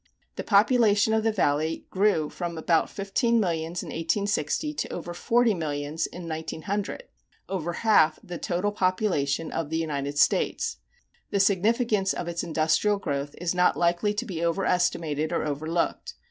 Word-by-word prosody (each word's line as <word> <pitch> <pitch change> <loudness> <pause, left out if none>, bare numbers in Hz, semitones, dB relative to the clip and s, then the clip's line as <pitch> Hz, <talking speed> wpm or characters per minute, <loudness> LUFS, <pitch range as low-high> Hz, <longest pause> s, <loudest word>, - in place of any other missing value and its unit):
The - - -4
population 215 0 +4
of 220 0 +2
the 225 - +2
Valley 160 -5 0
grew 190 -6 +2
from 170 -2 -5
about 165 0 +2
fifteen 230 +4 0
millions 170 -3 -1
in - - -8
1860 200 - -1
to - - -3
over 175 - -5
forty 230 +5 +2
millions 155 -1 -2
in 175 -1 -9
1900 165 - -4 0.4
over 175 -3 -3
half 170 -7 +3
the 175 -2 -7
total 180 +4 -1
population 185 -7 0
of 165 -3 -3
the 160 - -1
United 145 -3 -3
States. 460 - +1 0.5
The 200 - 0
significance 205 +1 +2
of 175 - -5
its 170 0 -2
industrial 160 +5 +1
growth 145 -6 -3
is 175 0 -1
not 180 0 +3
likely 175 +4 +1
to 210 - -2
be 170 -3 -4
overestimated 170 -3 0
or - - -1
overlooked. 155 +3 -2
175 Hz, 150 wpm, -26 LUFS, 160-205 Hz, 0.5 s, population